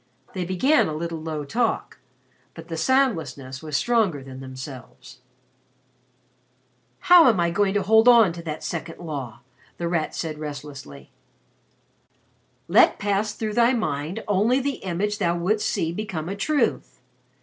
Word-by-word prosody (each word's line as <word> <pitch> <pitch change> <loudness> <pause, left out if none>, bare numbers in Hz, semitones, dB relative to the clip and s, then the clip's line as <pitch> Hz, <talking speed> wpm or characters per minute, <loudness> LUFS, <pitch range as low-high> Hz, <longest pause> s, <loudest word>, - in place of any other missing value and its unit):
They 185 -2 -3
began 225 - +2
a 155 - -4
little 165 +1 -4
low 155 -2 -4
talk, 230 +10 -2 0.6
but 165 0 -11
the 165 - -4
soundlessness 160 - 0
was 155 -2 -2
stronger 215 - +1
than 130 -1 -10
themselves. 130 -1 -10 1.8
"How 345 -6 +7
am 220 -6 +1
I 170 0 +1
going 200 +2 +1
to 205 - +1
hold 220 +4 +4
on 230 -7 +6
to 170 - -8
that 155 -2 -6
second 165 0 -5
law?" 140 -9 -7 0.4
The 170 - -3
Rat 170 -2 -1
said 155 -2 -4
restlessly. 140 - -9 1.6
"'Let - - +5
pass 205 +1 -1
through 215 -1 -3
thy 235 +3 +4
mind 160 - -3
only 210 +6 +2
the 275 0 -2
image 195 +3 -2
thou 175 -3 +1
wouldst 210 +5 0
see 160 - -1
become 180 -5 -5
a 195 - -3
truth.' 270 +4 -1
170 Hz, 145 wpm, -24 LUFS, 150-215 Hz, 1.8 s, How